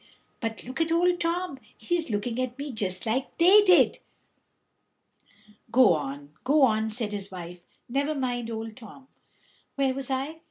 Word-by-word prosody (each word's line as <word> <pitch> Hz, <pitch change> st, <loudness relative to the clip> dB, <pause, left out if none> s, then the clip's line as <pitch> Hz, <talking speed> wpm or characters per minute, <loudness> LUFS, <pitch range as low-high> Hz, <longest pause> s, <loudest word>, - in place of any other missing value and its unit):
But 225 Hz, -2 st, -4 dB
look 260 Hz, +5 st, -5 dB
at 325 Hz, 0 st, 0 dB
Old 350 Hz, +1 st, +3 dB
Tom; 340 Hz, -4 st, -2 dB, 0.2 s
he's 330 Hz, +7 st, -1 dB
looking 225 Hz, +3 st, -2 dB
at 255 Hz, 0 st, -4 dB
me 285 Hz, 0 st, -5 dB
just 185 Hz, -5 st, -3 dB
like 255 Hz, +5 st, -2 dB
they 375 Hz, +5 st, +7 dB
did." 365 Hz, -4 st, +5 dB, 1.7 s
"Go 240 Hz, -6 st, +6 dB
on, 145 Hz, -1 st, -5 dB
go 290 Hz, +2 st, +4 dB
on," 220 Hz, -3 st, +3 dB
said 215 Hz, -1 st, -2 dB
his 200 Hz, -1 st, -5 dB
wife; 180 Hz, -2 st, -9 dB, 0.2 s
"never 280 Hz, +5 st, -1 dB
mind 245 Hz, -4 st, -2 dB
Old 225 Hz, -1 st, -5 dB
Tom." 260 Hz, +3 st, -14 dB, 0.7 s
"Where 270 Hz, -2 st, +1 dB
was 270 Hz, 0 st, -5 dB
I? 275 Hz, +5 st, -3 dB
255 Hz, 155 wpm, -27 LUFS, 220-295 Hz, 1.7 s, they